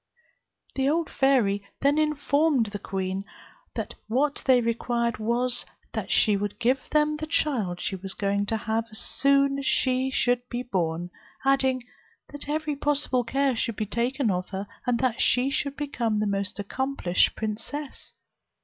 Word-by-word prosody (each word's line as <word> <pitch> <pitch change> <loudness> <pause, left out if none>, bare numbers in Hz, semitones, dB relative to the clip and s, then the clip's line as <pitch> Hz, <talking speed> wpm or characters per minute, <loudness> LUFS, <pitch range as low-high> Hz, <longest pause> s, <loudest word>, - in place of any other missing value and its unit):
The 270 0 +1
old 325 +1 0
fairy 235 -8 +3 0.2
then 285 +2 +3
informed 290 -5 +2
the 205 - -4
queen 190 0 -3 0.5
that - - -3
what 275 +6 +1
they 255 -2 +7
required 235 0 0
was, 240 +3 +1 0.3
that - - -3
she 210 - +4
would 205 0 -2
give 255 +3 +1
them 300 0 +2
the 310 - -5
child 230 - 0
she 195 - -2
was 190 +1 -6
going 200 0 0
to 225 - +1
have, 220 +1 -1
as 215 - -6
soon 275 +2 +2
as 275 - -5
she 260 0 +2
should 245 -2 +2
be 245 0 -3
born; 175 -5 -2 0.3
adding, 265 -2 +3 0.5
that 290 0 -7
every 305 0 -1
possible 280 -3 +1
care 270 +2 +1
should 230 -1 -1
be 215 - -2
taken 240 +3 0
of 180 0 -2
her, 195 0 -4 0.2
and 245 -1 +3
that 255 -2 +1
she 255 +2 +3
should 280 0 -1
become 240 -7 -1
the 215 - +1
most 200 -1 -2
accomplished 210 -2 +1
princess. 230 +7 -4
245 Hz, 160 wpm, -26 LUFS, 210-275 Hz, 0.5 s, they